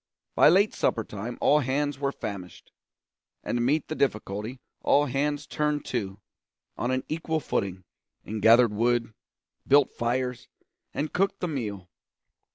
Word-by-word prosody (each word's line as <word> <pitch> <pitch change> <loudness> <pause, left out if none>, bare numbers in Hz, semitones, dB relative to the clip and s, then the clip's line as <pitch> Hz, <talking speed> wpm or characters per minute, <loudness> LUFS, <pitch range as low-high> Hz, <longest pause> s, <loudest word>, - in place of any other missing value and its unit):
By - - +6
late 195 +5 +4
supper 115 - 0
time 105 +4 -6
all 150 - +5
hands 145 +1 -1
were 140 -1 0
famished; 95 -8 -8 0.7
and - - -1
to - - 0
meet 140 +6 +1
the - - -3
difficulty 110 -2 -2 0.2
all 145 +1 +4
hands 145 +2 -1
turned 150 -1 -1
to, 100 -5 -2 0.6
on 120 - -2
an 130 0 0
equal 160 0 -1
footing, 95 -9 -2 0.4
and 110 0 -4
gathered 115 +1 +6
wood, 115 +1 +1 0.5
built 140 -1 +5
fires, 125 +1 -2 0.4
and 150 +2 -3
cooked 195 +2 +1
the 180 - -1
meal. 105 - -4
125 Hz, 145 wpm, -27 LUFS, 110-145 Hz, 0.7 s, By